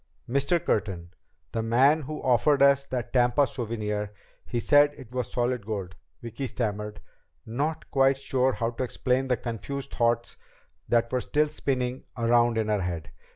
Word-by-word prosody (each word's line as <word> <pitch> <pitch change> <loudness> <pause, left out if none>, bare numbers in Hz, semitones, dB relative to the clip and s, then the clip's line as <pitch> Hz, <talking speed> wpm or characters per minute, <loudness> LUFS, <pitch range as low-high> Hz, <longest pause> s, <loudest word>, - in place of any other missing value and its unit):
"Mr. 140 +7 +2
Curtin 95 - -2 0.4
the 115 - -1
man 130 +7 +4
who 150 +2 -6
offered 135 +3 +4
us 140 0 +5
that 125 -2 -4
Tampa 125 +3 +4
souvenir 105 -4 -3 0.4
he 120 - -1
said 145 +3 +4
it 120 - -12
was 125 -1 -3
solid 125 -2 0
gold 100 -4 -4
" - - -45
Vicki 120 +4 -4
stammered, 105 -3 -3 0.4
not 145 +8 -3
quite 135 0 +4
sure 130 -1 +1
how 115 0 -1
to 125 - -3
explain 130 +1 0
the 125 -2 +1
confused 125 +4 -5
thoughts 120 0 0 0.5
that 115 0 +2
were 125 -1 0
still 150 +4 +1
spinning 130 -3 -2
around 120 0 +3
in 110 -1 0
her 105 -2 +1
head. 85 -4 -4
120 Hz, 160 wpm, -27 LUFS, 110-135 Hz, 0.5 s, us